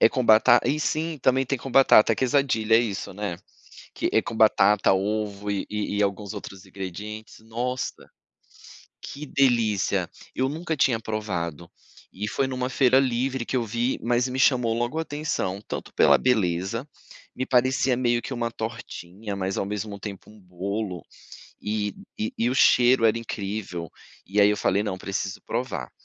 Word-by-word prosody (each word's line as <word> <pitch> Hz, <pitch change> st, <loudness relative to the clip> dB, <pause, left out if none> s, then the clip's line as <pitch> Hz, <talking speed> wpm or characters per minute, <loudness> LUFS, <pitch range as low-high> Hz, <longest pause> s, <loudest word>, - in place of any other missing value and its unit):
É -, -, +7 dB
com 130 Hz, +1 st, -1 dB
bata 115 Hz, +2 st, +6 dB
e 150 Hz, -, +1 dB
sim, 155 Hz, 0 st, -1 dB
também 130 Hz, +1 st, +3 dB
tem 135 Hz, +1 st, -1 dB
com 130 Hz, +2 st, -7 dB
batata, 120 Hz, -4 st, +6 dB
é -, -, +1 dB
quesadillas, 125 Hz, -4 st, +2 dB
é -, -, +4 dB
isso, 105 Hz, -5 st, -4 dB
né, 100 Hz, -3 st, -4 dB, 0.6 s
que -, -, -1 dB
é -, -, +4 dB
com 115 Hz, -, -6 dB
batata, 105 Hz, -2 st, +4 dB
ovo 105 Hz, +1 st, -2 dB
e 100 Hz, -1 st, -2 dB
e 105 Hz, -1 st, -1 dB
alguns 100 Hz, +1 st, -2 dB
outros 100 Hz, -1 st, -9 dB
ingredientes. 100 Hz, +3 st, -8 dB
Nossa, 120 Hz, +3 st, -4 dB, 0.9 s
que 150 Hz, +2 st, -8 dB
delícia! 120 Hz, -8 st, +1 dB, 0.3 s
Eu 130 Hz, +1 st, 0 dB
nunca 160 Hz, +2 st, -3 dB
tinha 130 Hz, -5 st, +2 dB
provado 90 Hz, -7 st, -4 dB, 0.4 s
e 105 Hz, +3 st, -4 dB
foi 135 Hz, -, 0 dB
numa 130 Hz, -1 st, -2 dB
feira 130 Hz, -1 st, +4 dB
livre 130 Hz, 0 st, -1 dB
que 130 Hz, -, -2 dB
eu 120 Hz, -, +1 dB
vi, 120 Hz, +3 st, -1 dB
mas 120 Hz, +2 st, +1 dB
me 130 Hz, +1 st, -4 dB
chamou 125 Hz, -4 st, +3 dB
logo 120 Hz, +6 st, -2 dB
atenção, 145 Hz, -11 st, -2 dB
tanto -, -, -6 dB
pela -, -, +6 dB
beleza, 110 Hz, -, 0 dB, 0.5 s
me 130 Hz, -, -3 dB
parecia 130 Hz, 0 st, +2 dB
meio 120 Hz, -1 st, +1 dB
que 135 Hz, -, -5 dB
uma 120 Hz, -1 st, -2 dB
tortinha, 105 Hz, -2 st, -6 dB
mas 95 Hz, 0 st, -2 dB
ao -, -, 0 dB
mesmo 105 Hz, 0 st, -4 dB
tempo 100 Hz, -1 st, -8 dB
um 105 Hz, -, -16 dB
bolo, 95 Hz, +1 st, -4 dB, 0.6 s
e 105 Hz, -1 st, -2 dB, 0.4 s
e 115 Hz, -, +1 dB
o 130 Hz, -, -1 dB
cheiro 125 Hz, -2 st, +5 dB
era 110 Hz, 0 st, +3 dB
incrível, 100 Hz, -6 st, -5 dB, 0.4 s
e 100 Hz, +2 st, +1 dB
aí 100 Hz, -, +6 dB
eu 105 Hz, -, 0 dB
falei: 100 Hz, +2 st, +1 dB
"Não, 95 Hz, -3 st, -3 dB
preciso 100 Hz, +1 st, -4 dB
provar". 100 Hz, -, -4 dB
110 Hz, 165 wpm, -25 LUFS, 100-125 Hz, 0.9 s, É